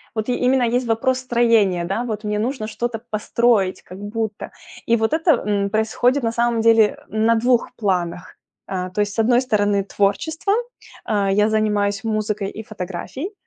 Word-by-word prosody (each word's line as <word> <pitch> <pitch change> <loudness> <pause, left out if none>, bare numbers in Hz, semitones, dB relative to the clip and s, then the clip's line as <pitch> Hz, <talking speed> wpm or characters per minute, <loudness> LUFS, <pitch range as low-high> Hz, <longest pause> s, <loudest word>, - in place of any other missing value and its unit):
вот 220 +2 -2
и 245 - +1
именно 255 0 +2
есть 245 +1 0
вопрос 255 +3 +1
строения. 230 -8 +2
Да, 195 +7 -2
вот 215 -2 -4
мне 210 0 -1
нужно 235 0 -2
что-то 235 +1 -3
построить 215 -2 +1
как 185 - -11
будто. 210 +1 -4 0.3
И 230 - +3
вот 220 +3 0
это, 325 +2 +3 0.2
м, 200 -1 0
происходит 225 +5 +1
на 230 - +1
самом 235 0 +1
деле, 225 0 +5 0.3
э, 220 - -6
на 225 +1 +3
2 240 +1 +2
планах. 180 -4 -2 0.3
А, 185 -1 -3
то 195 +3 -1
есть, 205 0 -1
с 225 - -4
одной 240 +2 +4
стороны, 205 -5 +1
творчество- 305 - 0 0.5
а, 200 -3 +1
я 210 +2 +3
занимаюсь 210 -1 0
музыкой 215 -2 -2
и 220 - -8
фотографией- 215 - -6
220 Hz, 175 wpm, -21 LUFS, 205-240 Hz, 0.5 s, деле